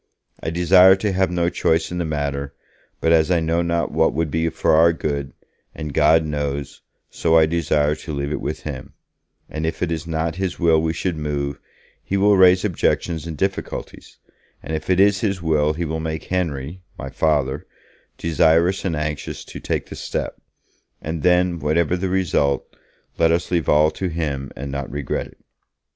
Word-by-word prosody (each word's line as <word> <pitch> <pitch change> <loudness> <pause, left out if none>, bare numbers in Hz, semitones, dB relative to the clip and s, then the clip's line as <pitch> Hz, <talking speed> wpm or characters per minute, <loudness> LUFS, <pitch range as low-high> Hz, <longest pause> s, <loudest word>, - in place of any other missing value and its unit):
I - - -2
desire 90 +3 +6
to 100 +1 -1
have 95 -1 +1
no 85 -1 0
choice 80 -1 0
in 90 - -3
the 85 - -1
matter, 70 -2 -3 0.4
but 80 - +1
as 80 -1 +4
I 90 -2 +3
know 80 +1 0
not 85 0 -1
what - - +2
would 80 -1 -1
be 80 +2 0
for - - 0
our 85 +2 +5
good, 70 -4 -3 0.4
and 75 -3 -6
God 80 +2 +4
knows, 75 -1 -4 0.3
so 80 -1 +2
I 80 - +6
desire 75 -2 +1
to 75 +1 -7
leave 70 0 -3
it - - -3
with - - -4
Him, - - -7 0.5
and 80 - -5
if 80 +2 -2
it 85 - -1
is 80 0 -3
not 80 +1 -2
His 95 -2 -2
will 80 -2 +4
we 80 0 0
should 85 0 -2
move, 70 -2 -3 0.4
He 100 - -1
will 100 +1 +4
raise 95 0 +5
objections 85 -3 -1
and 80 -2 -6
difficulties, 95 +3 -4 0.5
and 80 +2 -3
if 80 - -6
it 90 0 +3
is 100 0 +4
His 100 -4 0
will 75 -2 +1
He 85 +2 -3
will 80 +1 -3
make 80 0 -4
Henry 85 -2 -3 0.2
[my 65 - -7
Father] 70 -1 0 0.5
desirous 85 +3 +2
and 85 -4 -1
anxious 75 -1 -4
to - - -9
take - - -2
the - - -9
step, - - -4 0.6
and 80 0 -4
then, 90 0 +2
whatever 80 +3 +1
the 95 +1 -2
result, 90 -7 +1 0.5
let 80 - +4
us 85 +1 -1
leave 85 -3 0
all 75 +1 +4
to 95 - -3
Him 75 -5 -3
and 70 +2 -6
not 70 -1 -4
regret 70 +1 -3
it.' - - -20
80 Hz, 185 wpm, -21 LUFS, 75-90 Hz, 0.6 s, desire